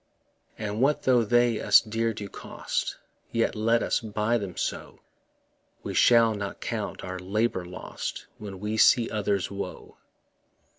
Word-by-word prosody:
And 105 +1 -3
what 145 +3 +2
tho' 125 -2 +4
they 120 0 +2
us 105 - +7
dear 115 +1 -1
do 105 -2 -6
cost, - - -4 0.3
Yet 115 0 +1
let 115 +2 +2
us - - +1
buy 110 +1 0
them 100 -4 -6
so; - - -4 0.8
We - - -4
shall 115 -2 +5
not 100 -1 -5
count - - -4
our 95 0 -5
labour 100 0 -1
lost 90 +1 -6
When 100 -3 -8
we 105 +2 -3
see 120 +1 +5
others' 100 -3 -1
woe. 100 0 -7
110 Hz, 145 wpm, -27 LUFS, 100-115 Hz, 0.8 s, us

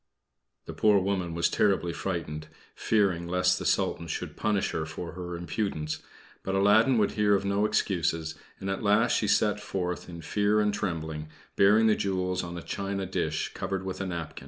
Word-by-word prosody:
The - - -7
poor 105 -1 +4
woman 95 -3 -1
was 85 - +2
terribly 95 -4 +1
frightened, 80 -4 -4 0.3
fearing 95 -6 +1
lest 90 0 +2
the - - -2
Sultan 85 - 0
should - - -4
punish 105 -2 0
her 80 - -2
for 85 +2 -6
her 90 0 -6
impudence; 85 -3 -3 0.4
but 95 - -2
Aladdin 110 +6 +5
would 105 -2 +2
hear 105 -1 +3
of 100 - -1
no 100 +2 +2
excuses, 85 -6 0 0.3
and 95 - -5
at 95 0 -2
last 105 +3 +3
she 105 - +1
set 105 +1 +2
forth 90 -4 -3
in 85 -1 -8
fear 105 +3 +2
and 105 -1 +2
trembling, 80 -6 -3 0.3
bearing 105 +3 +5
the 110 - +5
jewels 90 -2 -1
on 85 0 -6
a 85 - -7
china 100 0 -3
dish - - -2
covered 95 -1 -3
with 95 +1 -4
a 95 - -2
napkin. 85 -4 -5
95 Hz, 180 wpm, -28 LUFS, 85-105 Hz, 0.4 s, Aladdin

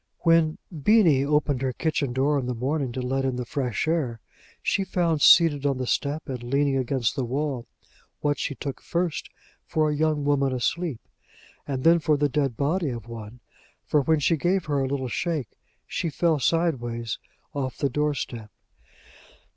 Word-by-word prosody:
When 165 -2 +3 0.2
Beenie 160 -4 +4
opened 145 -2 +1
her 130 -1 -1
kitchen 145 -2 -1
door 140 +3 +2
in 125 - -4
the 125 - -2
morning 135 +2 -1
to 130 0 -3
let 135 +2 -1
in 130 -1 0
the 125 0 -3
fresh 125 +1 -2
air, 145 -9 0 0.4
she 195 - +1
found 170 -5 0
seated 155 -5 +6
on 140 -2 +1
the 130 - -2
step, 145 +5 -1
and 130 -3 -4
leaning 140 +3 +1
against 130 -2 0
the 135 - -1
wall, 130 -1 -2 0.5
what 145 -1 0
she 140 - -2
took 140 -1 -6
first 170 -2 -2 0.4
for 155 -1 +1
a - - -1
young 155 -1 +1
woman 140 -2 +2
asleep, 140 +2 -1 0.7
and 135 -2 -3
then 170 +1 +6
for 155 -1 +2
the 145 0 +2
dead 135 -5 0
body 160 +3 0
of 120 -3 -6
one; 115 0 -9 0.4
for, 150 - +2
when 160 +3 +2
she 160 +3 +2
gave 180 +3 +1
her 145 -2 0
a 135 - 0
little 130 -1 -2
shake, 150 - -2 0.4
she 170 - -2
fell 160 0 +1
sideways 120 -8 0 0.3
off 130 -3 -3
the 140 - +1
door 150 +2 0
step. 115 -5 -5
140 Hz, 180 wpm, -25 LUFS, 130-155 Hz, 0.7 s, seated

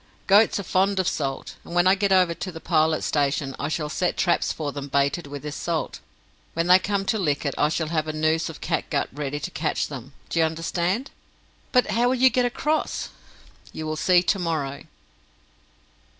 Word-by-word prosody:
"Goats 205 +1 +5
are - - -3
fond 190 +2 +1
of 185 - +1
salt, 135 -5 -3
and 170 - -8
when 175 0 +4
I 185 - +6
get 200 0 0
over 185 -3 +4
to 175 +3 -6
the 165 - -8
Pilot 160 -1 +1
Station 140 -2 0
I 145 - -1
shall 155 -1 -2
set 175 +4 -1
traps 175 - +2
for 150 -2 -3
them 140 0 -6
baited 140 +3 0
with 140 0 -7
this 150 -1 -5
salt. 165 -2 -3 0.6
When 165 0 +1
they 180 +1 +7
come 195 +1 -1
to 220 - 0
lick 150 -5 0
it, 140 - 0
I 150 - +2
shall 160 -1 -1
have 155 -1 -1
a - - -1
noose 155 +2 0
of 165 - -10
catgut - - -1
ready 145 0 -3
to - - -5
catch 155 +1 -1
them 135 -1 -8 0.2
do 170 - -1
you 165 - +5
understand?" 170 - -2 0.6
"But 250 -1 +3
how 240 +1 +2
will 260 - +2
you 260 0 +5
get 250 -1 +2
across?" 300 +6 -1 0.6
"You 155 - -5
will 155 0 -2
see 175 +3 +4
to 195 +2 +1
morrow." 150 -5 -3
165 Hz, 205 wpm, -24 LUFS, 150-185 Hz, 0.6 s, they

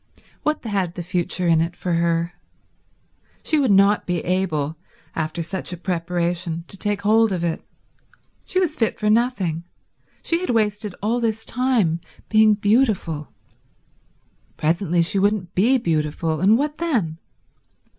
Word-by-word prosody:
What 305 -4 -1
had 195 -5 -1
the 175 - -5
future 175 +1 -1
in 165 -1 +4
it 170 +1 -2
for 180 -1 -2
her? 170 0 +1 1.1
She 310 - +2
would 270 -4 +2
not 200 +1 +4
be 180 -1 0
able, 165 -5 -1 0.4
after 160 +1 -2
such 180 +2 -3
a 180 - -5
preparation, 170 -1 -2
to - - -3
take 205 0 -2
hold 220 +1 +4
of 180 -3 -1
it. 170 -1 -2 0.8
She 370 - +1
was 340 -5 0
fit 225 -7 0
for 210 0 +2
nothing; 210 -9 +1 0.6
she 335 - +1
had 365 - -3
wasted 210 -3 0
all 230 +3 +1
this 225 -1 -1
time 225 -10 +1 0.3
being 215 -1 +5
beautiful. 205 - +1 1.3
Presently 170 +2 +1
she 195 +3 +2
wouldn't 200 -2 0
be 235 +8 +4
beautiful, 160 -4 -1
and 205 +4 +5
what 295 +2 -2
then? 225 - -1
190 Hz, 145 wpm, -22 LUFS, 170-220 Hz, 1.3 s, being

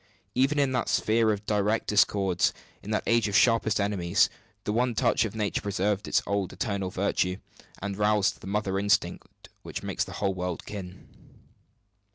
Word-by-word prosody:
Even 135 +4 +2
in 140 -2 +2
that 125 -3 -1
sphere 110 0 +2
of 105 0 -3
direst 105 +1 +1
discords, 100 -3 +2 0.3
in 105 - -10
that 105 - 0
age 115 -1 +3
of 100 - -2
sharpest 115 -2 +3
enmities, 100 -4 +2 0.3
the 105 - -2
one 120 +1 +1
touch 115 -1 +2
of 110 - -6
Nature 105 -2 -1
preserved 100 +1 -1
its - - +2
old 100 -2 -1
eternal 100 -3 -2
virtue, 90 -1 0 0.5
and 100 -1 -3
roused 105 -1 +1
the - - -9
mother 100 -1 -1
instinct 100 +1 -1
which - - -7
makes - - -1
the - - -9
whole 100 -1 -1
world 90 -2 -4
kin. 95 -2 -8
105 Hz, 170 wpm, -27 LUFS, 95-110 Hz, 0.5 s, age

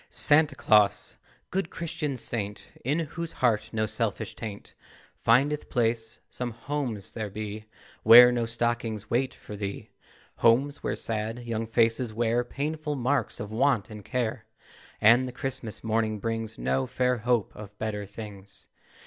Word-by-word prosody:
Santa 155 +1 +4
Claus! 105 -2 +3 0.4
Good 190 -3 -1
Christmas 150 -6 -3
saint, 105 -3 -4
In 140 +5 +1
whose 165 +1 -4
heart 110 -3 +1
no 110 -1 0
selfish 110 0 -2
taint 105 -3 -8 0.5
Findeth 140 +6 +2
place, 115 -2 0
some 125 -1 -3
homes 120 -3 -4
there 110 -2 -4
be 105 +1 -6 0.4
Where 120 +2 +10
no 120 -2 0
stockings 115 -2 -2
wait 130 +2 +1
for 105 - -9
thee, 100 -1 -5 0.5
Homes 135 +5 +3
where - - -1
sad 115 +2 -3
young 115 -1 -2
faces 115 0 +1
wear 120 +1 +1
Painful 150 +4 -3
marks 135 +2 0
of 105 0 -6
Want 115 -3 +1
and 105 -1 -9
Care, 120 -2 -2 0.5
And 120 +4 +6
the - - -5
Christmas 125 -3 -5
morning 110 -1 0
brings 115 +1 -3
No 130 -1 0
fair 125 -1 +1
hope 115 -1 0
of 105 -1 -10
better 105 -2 -3
things. 100 -2 -10
115 Hz, 145 wpm, -27 LUFS, 110-130 Hz, 0.5 s, Where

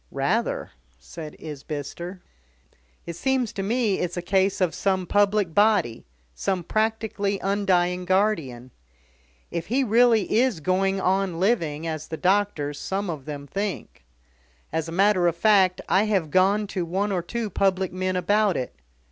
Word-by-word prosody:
"Rather," - - -1 0.3
said 150 - -9
Isbister. 155 +4 -7 0.8
"It 170 - -6
seems 260 +2 0
to 195 - -3
me 220 0 0
it's 180 0 -3
a 175 - -3
case 190 +1 +1
of 180 -4 +1
some 190 -2 0
public 205 -2 +2
body, 205 - +2 0.3
some 185 - -2
practically 215 -1 -1
undying 180 -3 +1
guardian. 165 - 0 0.8
If 170 -1 -4
he 260 +5 +1
really 230 -2 +3
is 250 -8 +1
going 190 +4 +1
on 190 -2 0
living 165 -7 0
as 155 -1 -4
the 160 - -5
doctors, 180 -7 0
some 195 -1 -2
of 145 -5 -7
them, 145 -2 -6
think. 200 - -5 0.7
As 160 0 -2
a - - -6
matter 185 0 +3
of 170 - +1
fact, 190 -3 +4
I 200 +3 +3
have 190 -8 0
gone 195 +3 +3
to 185 - -1
one 190 +5 -1
or 185 -2 0
two 220 +4 -4
public 190 -1 +1
men 185 0 -1
about 205 +2 +2
it. 125 - -4
190 Hz, 150 wpm, -24 LUFS, 170-205 Hz, 0.8 s, fact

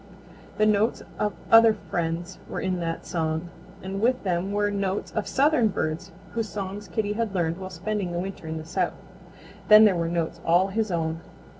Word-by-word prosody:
The 215 - +4
notes 215 +2 +2 0.2
of 210 -1 0 0.2
other 225 -1 +8
friends 175 -1 -3
were - - -3
in 185 -1 -1
that 165 -1 -3
song, 160 0 -2 0.3
and 195 +1 -4
with 250 +3 +2
them 185 0 -1
were 205 0 +1
notes 200 -1 -2
of 215 - -2
southern 275 -4 +3
birds 155 -5 -3 0.2
whose 225 -2 -2
songs 200 0 -5
Kitty 205 +3 -1
had 220 -2 -2
learned 170 0 0
while 185 0 -6
spending 190 +1 -3
the 175 - -3
winter 185 -2 -5
in 160 0 -3
the 160 - -7
South. 165 - -1 0.7
Then 215 +1 +9
there 200 -3 +4
were 170 -1 -1
notes 170 -1 -2
all 175 +3 +3
his 215 +2 -1
own. 165 -2 -1
190 Hz, 185 wpm, -26 LUFS, 170-210 Hz, 0.7 s, Then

